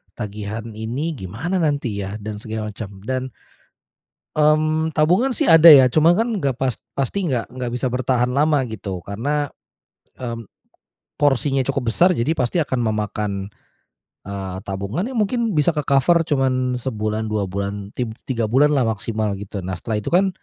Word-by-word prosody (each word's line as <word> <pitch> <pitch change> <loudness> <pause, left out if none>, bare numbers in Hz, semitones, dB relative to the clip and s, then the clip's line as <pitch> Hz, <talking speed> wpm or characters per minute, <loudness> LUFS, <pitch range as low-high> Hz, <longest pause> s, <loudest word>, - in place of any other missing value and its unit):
tagihan 105 +1 -5
ini 115 +9 -3
gimana 120 - -3
nanti 140 -9 0
ya, 100 +2 -6
dan 105 0 -5
segala 110 0 -4
macam. 100 0 -7
Dan, 130 +2 -1 1.2
mmm, 155 +1 +2
tabungan 185 - +3
sih - - 0
ada 165 0 +9
ya, 140 -4 +10
cuman 155 +5 +5
kan 230 - +2
nggak 135 -3 0
pas 130 -2 0 0.2
pasti 175 +8 -1
nggak 120 -4 -2
nggak 125 -2 -4
bisa 130 +1 -1
bertahan 125 0 +1
lama 145 0 +3
gitu. 100 -5 -6
Karena, 140 +8 -2 0.7
mmm, 115 -2 -5 0.7
porsinya 140 -1 +2
cukup 135 -4 -1
besar, 180 +1 +4
jadi 120 +7 +1
pasti 125 +6 0
akan 130 -3 -2
memakan, 105 -3 -2 0.8
eee, 95 -2 -5
tabungan 100 - -3
yang 255 - -5
mungkin 225 +1 0
bisa 150 +3 +4
ke-cover 150 +3 +3
cuman 130 -3 +1
sebulan, 110 -3 -2
2 105 -2 0
bulan, 100 +1 -4
tig 120 -3 -2 0.2
tiga 115 -4 0
bulan 135 +6 +4
lah 130 -3 +3
maksimal 110 0 -2
gitu. 100 0 -6
Nah, 95 - -3
setelah 110 +2 -3
itu - - -4
kan, 190 +2 +4
125 Hz, 160 wpm, -21 LUFS, 105-150 Hz, 1.2 s, ya